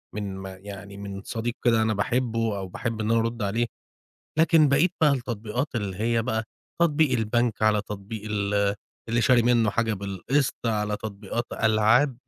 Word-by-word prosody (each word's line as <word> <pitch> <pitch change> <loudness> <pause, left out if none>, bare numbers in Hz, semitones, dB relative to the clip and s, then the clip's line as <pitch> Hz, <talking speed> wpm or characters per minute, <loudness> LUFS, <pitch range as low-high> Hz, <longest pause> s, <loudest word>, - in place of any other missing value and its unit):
من 100 -2 -4
ما 95 0 -7
يعني 100 +1 -10
من 100 -1 -6
صديق 115 +2 -3
كده 115 -2 +4
أنا 110 0 +2
باحبّه 115 0 0
أو 95 -1 -4
باحب 115 +4 -4
إن 110 +1 0
أنا 115 - +4
أرُد 115 +1 -2
عليه، 110 +4 +1 0.7
لكن 160 -2 +5
بقية 150 +6 +4
بقى 155 -2 +6
التطبيقات 120 0 -2
اللي 100 -5 -2
هي 115 +2 +1
بقى 110 -1 -1 0.4
تطبيق 155 -3 +3
البنك 115 0 0
على 105 -1 +3
تطبيق 105 +1 -7
ال 100 -1 +1 0.3
اللي 115 +1 +2
شاري 125 -1 +5
منّه 115 -2 +3
حاجة 115 0 0
بالقسط 100 +8 -1
على 105 -2 0
تطبيقات 105 +2 -4
ألعاب. 110 +4 +3
110 Hz, 165 wpm, -26 LUFS, 100-120 Hz, 0.7 s, بقى